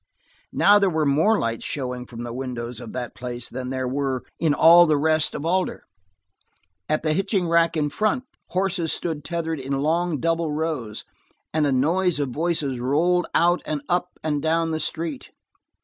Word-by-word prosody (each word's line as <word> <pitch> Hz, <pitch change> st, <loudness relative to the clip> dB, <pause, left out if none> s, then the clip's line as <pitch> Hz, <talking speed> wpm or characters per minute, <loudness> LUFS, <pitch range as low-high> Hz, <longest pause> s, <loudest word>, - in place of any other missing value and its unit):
Now 205 Hz, +1 st, +5 dB
there 200 Hz, -1 st, +3 dB
were 160 Hz, -3 st, 0 dB
more 160 Hz, +11 st, +3 dB
lights 115 Hz, -, -2 dB
showing 125 Hz, -3 st, -3 dB
from 120 Hz, -1 st, -8 dB
the 120 Hz, -1 st, -6 dB
windows 125 Hz, -2 st, -5 dB
of 110 Hz, -, -8 dB
that 125 Hz, -1 st, -5 dB
place 120 Hz, -1 st, -4 dB
than 125 Hz, +1 st, -5 dB
there 130 Hz, -1 st, -2 dB
were 135 Hz, -1 st, -2 dB, 0.2 s
in 155 Hz, -3 st, +2 dB
all 170 Hz, +2 st, +7 dB
the 155 Hz, -1 st, +3 dB
rest 155 Hz, +1 st, +2 dB
of 145 Hz, -, -5 dB
Alder; 185 Hz, +2 st, 0 dB, 1.1 s
at 155 Hz, -, 0 dB
the 155 Hz, -1 st, +1 dB
hitching 190 Hz, +1 st, 0 dB
racks 170 Hz, 0 st, +3 dB
in 150 Hz, -1 st, 0 dB
front, 215 Hz, -, 0 dB, 0.2 s
horses 180 Hz, -3 st, -1 dB
stood 160 Hz, -4 st, -2 dB
tethered 165 Hz, -2 st, -3 dB
in 135 Hz, +1 st, -4 dB
long 160 Hz, +3 st, 0 dB
double 165 Hz, +1 st, 0 dB
rows, 150 Hz, -9 st, -3 dB, 0.5 s
and 155 Hz, -1 st, +2 dB
a -, -, +1 dB
noise 165 Hz, +6 st, +2 dB
of 140 Hz, -2 st, -1 dB
voices 150 Hz, -2 st, -1 dB
rolled 165 Hz, +8 st, +1 dB
out 175 Hz, +1 st, +3 dB
and 150 Hz, -2 st, -3 dB
up 175 Hz, 0 st, +1 dB, 0.2 s
and 150 Hz, -2 st, -1 dB
down 165 Hz, +1 st, +1 dB
the 160 Hz, -, -1 dB
street. 155 Hz, -1 st, -4 dB
155 Hz, 180 wpm, -23 LUFS, 130-170 Hz, 1.1 s, all